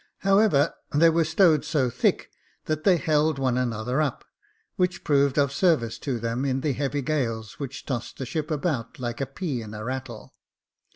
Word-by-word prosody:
However, 195 -6 +3 0.2
they 165 +3 +5
were 165 +1 +3
stowed 160 -1 +4
so 130 -5 0
thick, 125 - 0 0.3
that 155 0 -2
they 185 -3 +5
held 155 -3 +1
one 130 -2 +1
another 125 +2 -1
up, 145 -5 -2 0.5
which 180 -1 0
proved 140 -2 +2
of 140 -1 +2
service 140 -8 +1
to 135 -4 -2
them 115 +3 -2
in 135 -1 0
the 145 -1 0
heavy 140 +1 -2
gales 115 -8 -2
which 140 -1 -6
tossed 120 -4 -4
the 135 - -4
ship 150 +4 -3
about 150 -6 -2
like 120 0 -4
a 135 - -1
pea 135 -3 -4
in 110 -1 -8
a 105 - -6
rattle. 125 -2 -6
140 Hz, 180 wpm, -25 LUFS, 125-155 Hz, 0.5 s, they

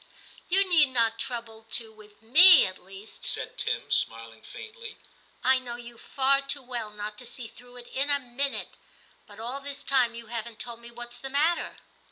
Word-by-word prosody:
' - - -23
You 390 +1 +5
need 325 -5 +5
not 230 -3 +1
trouble 230 -4 -5
to 225 -2 0
with 215 0 -18
me^ 325 +7 +9
at 185 -1 -7
least,' 195 +3 -12
said - - -1
Tim, - - -2
smiling 115 0 -1
faintly; 460 0 -10 0.3
* - - -32
I 260 - +2
know 245 -2 -7
you 240 -1 -11
far 275 0 +1
too 275 0 -3
well 245 -3 -5
not 210 0 -7
to 250 - -8
see 245 - -7
through 245 +2 -14
it 240 -1 -11
in 275 +2 -1
a 285 - +5
minute. 270 +2 -3 0.5
But 205 0 -14
all 245 +5 -4
this 280 0 -7
time 250 -4 +2
you 235 0 -8
haven't 230 0 -6
told 235 0 -3
me 235 0 -11
what's 240 0 -8
the 270 - -6
matter.' 305 +5 +1
240 Hz, 200 wpm, -27 LUFS, 225-275 Hz, 0.5 s, me^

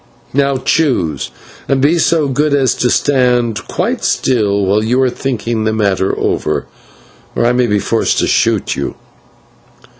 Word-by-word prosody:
Now 140 0 +1
choose, 120 - 0 0.4
and 135 - +1
be 155 +6 +2
so 160 -2 +2
good 145 +2 +1
as 135 -3 +2
to 125 - 0
stand 125 -6 +1
quite - - -2
still 100 -6 +1
while 100 +3 +1
you 120 +4 +1
are 130 - +1
thinking 120 -4 -3
the 110 0 0
matter 100 -3 0
over, - - -1 0.7
or - - +1
I 120 - +3
may 125 0 +1
be 105 -1 +1
forced 110 +3 0
to - - +2
shoot - - +1
you." - - -4
125 Hz, 155 wpm, -15 LUFS, 110-135 Hz, 0.7 s, I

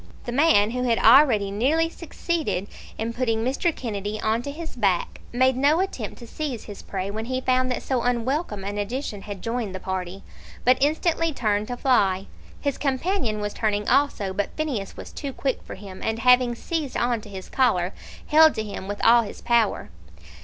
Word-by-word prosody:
The - - -5
man 240 -6 +4
who 250 +1 -2
had 240 -2 +2
already 225 -5 +6
nearly 285 +11 +2
succeeded 330 - -3 0.3
in 225 +1 -3
putting 230 -2 0
Mr. 275 +7 +1
Kennedy 210 -3 -4
on 220 +2 0
to 285 - -6
his 320 +3 -7
back, 195 -7 0
made 260 +1 +3
no 285 +5 +3
attempt 385 +1 -3
to 240 - -10
seize 270 -4 -4
his 205 -2 -9
prey 195 0 -4
when 220 +2 -4
he 255 +1 -2
found 255 0 +1
that 250 - -2
so 260 -3 0
unwelcome 245 - -1
an 205 +1 -3
addition 210 0 -3
had 200 -2 -8
joined 230 -4 -2
the - - -4
party, 185 0 -4 0.4
but 255 +1 +5
instantly 320 +3 +1
turned 215 -6 0
to 245 - -4
fly. 195 -8 +2 0.3
His 280 -2 -2
companion 270 - -1
was 205 0 -3
turning 210 -2 -1
also, 215 -9 +2
but 200 +1 -3
Phineas 265 -11 -3
was - - -9
too 280 -2 -5
quick 265 -1 -2
for - - -9
him, 190 -1 -10
and 220 0 -1
having 250 0 +4
seized 310 +1 -3
on 240 -2 0
to 210 - -12
his 190 -2 -8
collar, 190 -9 +1 0.3
held 315 0 +6
to 220 - -2
him 200 -2 -7
with 205 0 -3
all 235 +1 +7
his 215 - -7
power. 235 - +1
235 Hz, 190 wpm, -24 LUFS, 205-275 Hz, 0.4 s, all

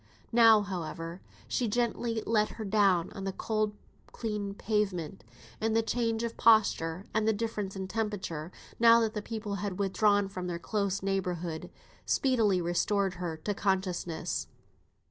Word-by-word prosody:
Now, 225 -2 +7
however, 170 -2 -5 0.3
she 245 - 0
gently 230 0 -1
let 215 -1 +2
her 220 - -6
down 195 -4 +3
on 195 - -7
the 195 - -1
cold 215 +1 -1 0.4
clean 210 -3 -3
pavement; 195 -6 -1 0.4
and 220 0 +1
the 225 - +3
change 230 0 0
of 230 -1 -4
posture, 200 -5 +3
and 220 0 +1
the 220 - +4
difference 210 -3 -3
in 190 -1 -4
temperature, 190 -7 -3 0.3
now 230 0 +7
that 220 -1 0
the 210 - -3
people 210 -2 -4
had 200 -3 -3
withdrawn 205 0 +2
from 185 -2 -5
their 175 -1 -2
close 200 +1 -1
neighbourhood, 180 -4 -2 0.3
speedily 225 -8 +2
restored 185 +3 +1
her 165 -3 -3
to 205 +6 -2
consciousness. 185 -4 -1
205 Hz, 145 wpm, -30 LUFS, 185-220 Hz, 0.4 s, Now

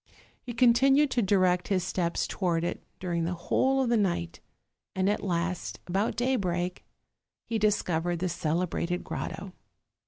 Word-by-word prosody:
He 245 - -6
continued 265 +4 +4
to 245 - +2
direct 185 -3 +2
his 190 -3 +1
steps 175 -2 -1
toward 170 -4 -1
it 175 - -3 0.2
during 170 -2 -1
the 175 +2 -1
whole 265 +10 +1
of 245 - -1
the 235 - +3
night; 170 - -1 0.6
and 190 0 +1
at 205 - +1
last, 180 -1 -2
about 195 +5 0
day 255 +2 +1
break, 180 -2 -2 0.6
he 225 -1 -1
discovered 175 -5 +1
the 185 +2 -1
celebrated 170 +1 -1
grotto. - - -5
185 Hz, 150 wpm, -28 LUFS, 175-225 Hz, 0.6 s, continued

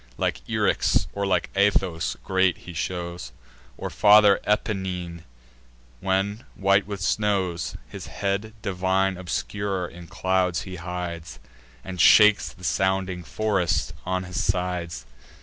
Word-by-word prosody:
Like - - -1
Eryx, - - +2
or 100 0 -1
like 90 -3 0
Athos, 95 -4 +1
great 95 -2 +2
he 90 - -8
shows, 85 -3 -4 0.5
Or - - -5
Father 105 -1 +6
Apennine, 90 -5 -2 0.7
when, 95 +4 -1
white 100 0 +3
with 100 -3 -5
snows, 90 - 0
His - - -9
head 100 +2 -2
divine 95 +1 +1
obscure 95 +1 -3
in 85 0 -11
clouds 95 -1 0
he 95 -1 -7
hides, 85 -1 -5 0.5
And 90 -3 -3
shakes 105 +2 +6
the 90 - -17
sounding 95 -1 0
forest 100 -3 0
on 95 0 -1
his 90 -1 -3
sides. 90 -3 -2
95 Hz, 120 wpm, -25 LUFS, 90-100 Hz, 0.7 s, Father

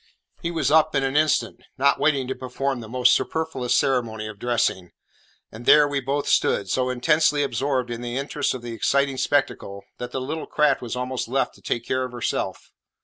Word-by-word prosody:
He 170 - -2
was 160 -5 0
up 155 -1 +4
in 135 - +2
an 135 +1 -1
instant, 155 0 +1 0.2
not 140 +1 +3
waiting 140 -4 +2
to 130 - -2
perform 130 +1 -3
the 115 - -8
almost 125 +1 +3
superfluous 160 -6 -1
ceremony 115 -5 0
of 110 -2 -8
dressing, 110 -7 -1 0.6
and 115 +3 -11
there 150 -1 +7
we 145 -1 -1
both 140 +2 -2
stood, 95 -2 +1
so 130 -1 +1
intensely 150 +3 +2
absorbed 135 -3 -1
in 120 0 -5
the 120 +1 -4
interest 140 0 -1
of 125 - -8
the 120 -1 -6
exciting 140 +3 +1
spectacle 100 -8 -1 0.2
that 125 - -5
the 130 - -3
little 150 +5 -4
craft 150 -3 +2
was 120 0 -5
almost 125 0 -3
left 135 +3 0
to - - -20
take 115 0 -3
care 130 0 0
of 125 -1 -6
herself. 120 - -3
130 Hz, 200 wpm, -23 LUFS, 120-145 Hz, 0.6 s, there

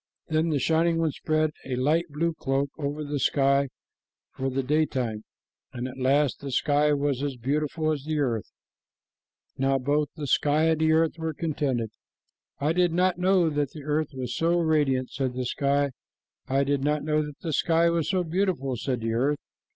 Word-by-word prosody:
Then 160 +1 +1
the 150 - +1
Shining 165 +4 +2
One 165 -2 +1
spread 155 +1 0
a 130 - -3
light 155 +7 +1
blue 165 +3 -1
cloak 140 -2 -1
over 145 +1 -3
the 145 -1 -3
sky 140 0 +2 0.6
for 135 0 -3
the 135 +1 -1
daytime, 130 -7 0 0.5
and 125 0 -4
at 130 +1 -9
last 140 +2 +2
the 140 - -6
sky 145 +3 +2
was 140 -2 0
as 140 -2 -2
beautiful 150 +5 -1
as 145 -3 -3
the 155 0 -1
earth. 120 -8 -1 1.1
Now 135 0 +2
both 145 +3 0 0.2
sky 150 +3 +2
and 160 -1 +1
earth 160 +1 +2
were 160 -2 -3
contented. 135 -9 -1 0.7
"I 145 +3 +1
did 175 -1 +2
not 180 0 +2
know 180 -3 +3
that 145 -2 -1
the 150 - -9
earth 150 +1 0
was 125 -2 -4
so 170 +1 +2
radiant," 145 -6 +1
said 130 -3 -2
the 130 0 -2
sky. 140 +2 +1 0.6
"I 135 +1 +2
did 140 -1 0
not 150 +1 +1
know 155 0 +1
that 150 -1 -9
the 160 -3 -3
sky 170 +3 +3
was 165 -3 0
so 185 -2 +1
beautiful," 170 -7 -1
said 125 +1 -2
the 115 0 -1
earth. 140 +6 +1
145 Hz, 180 wpm, -26 LUFS, 135-160 Hz, 1.1 s, know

